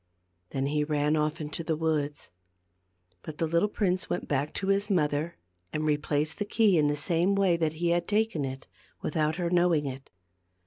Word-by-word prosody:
Then 135 0 -2
he 150 +1 +1
ran 150 0 +1
off 155 +2 0
into 155 +1 -4
the 160 -1 0
woods. 150 - -2 0.9
But 155 -1 -8
the 165 - +1
little 170 +6 +2
prince 185 -3 0
went 175 - -2
back 140 +1 0
to 195 - -2
his 200 +1 +2
mother 155 -2 0 0.3
and 155 - -2
replaced 150 +2 0
the - - +1
key 205 -4 +3
in 150 - +3
the 145 - +1
same 170 +6 +1
way 195 -3 +3
that 160 -2 0
he 170 +2 -1
had 175 0 +1
taken 210 -7 +1
it, 135 0 -5 0.4
without 155 0 0
her 175 -1 -2
knowing 175 -4 +3
it. 135 0 -6
155 Hz, 185 wpm, -28 LUFS, 150-175 Hz, 0.9 s, key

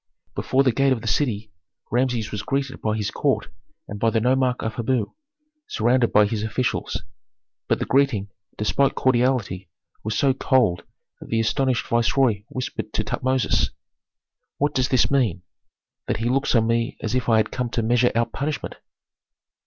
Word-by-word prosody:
Before 135 +1 +1
the 130 - +3
gate 135 +3 +3
of 115 - -4
the 115 - -6
city 110 -2 0 0.4
Rameses 120 -2 0
was 105 - -3
greeted 135 +1 -3
by 110 0 0
his 105 -2 -2
court - - 0 0.4
and 105 - -7
by 115 - +3
the 115 - +1
nomarch 125 +1 +1
of 110 - -2
Habu 120 -1 -1 0.5
surrounded 120 +2 +2
by 105 0 +5
his 105 0 -2
officials. 110 +3 -2 0.6
But - - +2
the - - -2
greeting, 130 -7 +2 0.3
despite 135 +6 +1
cordiality, 120 -8 +1 0.3
was 110 0 -2
so 135 -2 +3
cold 120 -10 +1 0.3
that - - -12
the 115 - +1
astonished 125 +3 +1
viceroy 115 -2 +2
whispered 130 -1 -5
to - - 0
Tutmosis, 130 0 0 0.9
"What 145 +1 0
does 130 -1 +1
this 130 0 +3
mean, 115 -10 +1 0.6
that - - 0
he 115 - -3
looks 135 +1 +1
on 115 -1 +4
me 115 0 0
as 110 - -2
if 125 -1 0
I 115 - +5
had 110 - +1
come 125 -2 -2
to 115 -1 -1
measure 120 +2 +3
out 115 0 +1
punishment?" 145 +1 -3
120 Hz, 170 wpm, -23 LUFS, 110-130 Hz, 0.9 s, by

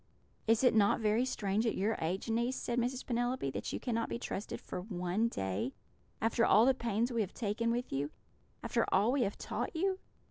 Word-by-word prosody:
"'Is 225 +2 +4
it 250 - +6
not 205 -2 +4
very 220 +3 +2
strange 215 -2 0
at - - 0
your 210 +4 +1
age, 175 +7 -2
niece,' 235 +3 +1
said 240 0 -1
Mrs. 250 +2 -1
Penelope, 245 - 0
'that - - -4
you - - -3
cannot 230 -2 -1
be - - -2
trusted 210 -3 -4
for - - -6
one 185 +2 0
day, 95 - -2 0.5
after 230 +1 +2
all 225 0 +6
the 265 - +5
pains 235 0 0
we 235 -2 +1
have 200 -2 -4
taken 230 +1 -1
with 240 - -1
you, 140 +2 -1 0.5
after - - +1
all 205 +5 +4
we 275 0 +2
have 200 -4 0
taught - - -4
you?' 380 +3 0
225 Hz, 205 wpm, -33 LUFS, 200-245 Hz, 0.5 s, it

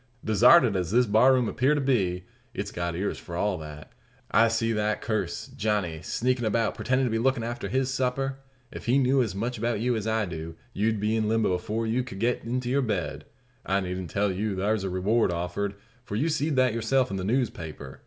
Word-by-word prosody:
"Desarted 120 +2 +6
as 90 -3 -1
this 125 +5 +4
bar 110 +5 +5
room 125 -3 +3
appear 135 +7 +2
to - - 0
be, 95 -10 0 0.3
it's - - -4
got 85 -1 -3
ears 95 +4 -2
for 85 - -8
all 95 0 0
that. 75 -1 -10 0.4
I 115 - +5
see 115 0 0
that 105 0 0
curse, 110 -1 -2
Johnny, 100 -7 -1
sneakin' 125 0 -1
about, 110 0 +1
pretendin' 130 +1 0
to 120 - -1
be 115 - 0
lookin' 130 0 +1
after 120 +1 -4
his 130 0 0
supper. 135 +1 -1 0.3
If - - -9
he 125 +3 +4
knew 135 0 +3
as 110 -6 -2
much 115 +3 -3
about 115 -1 0
you 120 +2 +1
as 110 -1 -3
I 110 -1 +1
do, 80 -2 -6 0.2
you'd 110 +1 0
be 105 +2 0
in 110 -1 0
limbo 110 -4 +2
afore 110 +4 -2
you 115 +3 +1
ked 120 -6 -9
get 120 +4 0
into 125 +1 -2
your 135 +3 +2
bed. 100 - -2 0.4
I 95 +1 +1
needn't 90 -2 -4
tell 100 +4 +1
you 100 +1 -2
thar's 105 +1 0
a 95 - -2
reward 100 +4 +1
offered; 90 +4 -3 0.3
for 105 - -6
you 150 +10 +1
seed 150 -1 0
that 130 -3 +3
yourself 115 +1 +1
in 95 - -2
the 95 - -3
newspaper. 85 - -3
110 Hz, 215 wpm, -27 LUFS, 95-125 Hz, 0.4 s, Desarted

